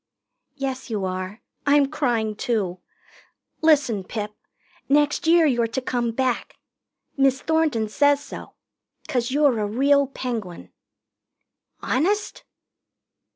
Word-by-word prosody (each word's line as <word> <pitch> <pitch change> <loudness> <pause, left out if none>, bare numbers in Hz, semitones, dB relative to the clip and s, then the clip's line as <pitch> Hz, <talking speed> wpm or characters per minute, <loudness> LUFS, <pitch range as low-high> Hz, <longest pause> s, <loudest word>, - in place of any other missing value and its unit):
"Yes, 270 -2 -4
you 210 -4 -2
are. 185 +3 -5 0.2
I'm 285 0 +5
crying, 235 -8 0
too. 205 -7 -1 0.8
Listen, 280 -10 +3
Pip. 210 +1 -5 0.6
Next 295 +3 +2
year 335 0 +6
you're 240 -5 +2
to 230 +3 -2
come 245 -2 -1
back. 250 +1 -1 0.6
Miss 270 -1 +3
Thornton 315 -9 +1
says 285 +6 +3
so. 290 - -10 0.5
'Cause 245 -2 -1
you're 280 -3 +3
a 210 - 0
real 280 +5 +3
Penguin." 230 -9 -5 1.1
"Honest?" 395 +10 0
255 Hz, 110 wpm, -23 LUFS, 220-285 Hz, 1.1 s, year